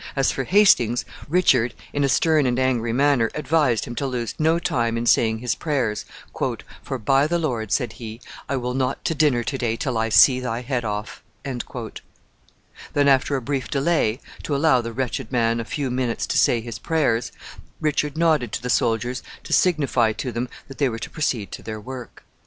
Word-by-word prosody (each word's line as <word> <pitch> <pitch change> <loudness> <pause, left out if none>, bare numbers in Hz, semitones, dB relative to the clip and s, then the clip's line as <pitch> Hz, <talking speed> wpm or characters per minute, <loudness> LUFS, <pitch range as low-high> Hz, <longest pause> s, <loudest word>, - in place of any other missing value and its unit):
As 135 -1 +2
for 135 - -3
Hastings, 125 - +4 0.2
Richard, 130 -8 +3 0.2
in 145 - 0
a 140 - +2
stern 155 +1 +3
and 125 0 0
angry 125 -3 +1
manner, 135 -2 +3
advised 150 -6 +1
him 120 - -6
to 140 - -1
lose 120 -4 -3
no 160 +2 +3
time 115 -8 0
in 115 - -2
saying 110 -1 +3
his 120 +1 -1
prayers, 130 -9 -2 0.8
"for, 135 - -4
by 135 +5 +2
the 170 +2 +1
Lord," 120 -10 -2
said 120 -5 0
he, 115 -1 -8 0.3
"I 135 - 0
will 125 -1 -2
not 130 0 -2
to - - +1
dinner 145 -6 +2
to 135 +3 -3
day 115 -2 0
till 125 -2 -2
I 115 0 0
see 130 +3 +6
thy 125 -2 -3
head 125 -1 -2
off." 105 0 -4 0.2
Then, 125 +2 -6
after 135 +1 +3
a 130 - -2
brief 135 0 -2
delay, 140 -5 +1 0.2
to 145 - -2
allow 140 -3 +3
the 115 0 -5
wretched 125 0 -3
man 115 -2 +1
a 115 - -4
few 135 +1 -3
minutes 125 -2 -1
to - - -1
say 120 - +3
his 115 0 -7
prayers, 135 -8 0 0.5
Richard 150 -1 -1
nodded 155 -9 +2
to - - -2
the 125 - -1
soldiers 115 +2 0 0.2
to - - -4
signify 140 -10 +3
to 125 +3 -4
them 120 +1 -3 0.2
that 135 - -11
they 140 -3 +3
were 115 - -4
to - - -7
proceed 120 -9 -2
to - - -7
their 110 -1 -6
work. 125 +2 -9
125 Hz, 195 wpm, -23 LUFS, 115-145 Hz, 0.8 s, see